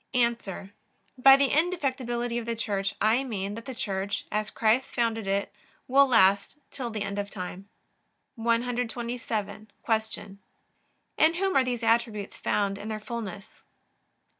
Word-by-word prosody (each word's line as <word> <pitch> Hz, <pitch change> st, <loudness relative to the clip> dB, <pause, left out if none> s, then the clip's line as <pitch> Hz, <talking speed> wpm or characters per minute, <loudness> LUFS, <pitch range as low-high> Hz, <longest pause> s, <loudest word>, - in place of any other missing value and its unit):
A. 240 Hz, -1 st, +5 dB, 0.9 s
By 270 Hz, +1 st, +9 dB
the 275 Hz, -1 st, +3 dB
indefectibility 255 Hz, -8 st, 0 dB
of 230 Hz, -, -8 dB
the 230 Hz, -, -1 dB
Church 200 Hz, -3 st, -2 dB
I 225 Hz, +5 st, +3 dB
mean 205 Hz, -6 st, -3 dB
that 230 Hz, +2 st, -8 dB
the 260 Hz, -, -6 dB
Church, 200 Hz, -4 st, -2 dB
as 215 Hz, 0 st, -1 dB
Christ 230 Hz, +4 st, +2 dB
founded 225 Hz, -3 st, -1 dB
it, 200 Hz, +1 st, -1 dB, 0.3 s
will 275 Hz, +2 st, +6 dB
last 200 Hz, 0 st, +4 dB
till 250 Hz, -3 st, -4 dB
the 215 Hz, -2 st, -3 dB
end 200 Hz, 0 st, -3 dB
of 200 Hz, 0 st, -3 dB
time. 190 Hz, 0 st, -7 dB, 0.6 s
127. 230 Hz, -3 st, -2 dB
Q. 220 Hz, -3 st, -2 dB, 0.8 s
In 315 Hz, +1 st, +5 dB
whom 385 Hz, +2 st, 0 dB
are 270 Hz, -, +5 dB
these 245 Hz, -2 st, -3 dB
attributes 225 Hz, -3 st, +1 dB
found 200 Hz, -1 st, -1 dB
in 205 Hz, -, -7 dB
their 215 Hz, -1 st, -3 dB
fullness? 210 Hz, -3 st, -7 dB
230 Hz, 140 wpm, -27 LUFS, 205-245 Hz, 0.9 s, By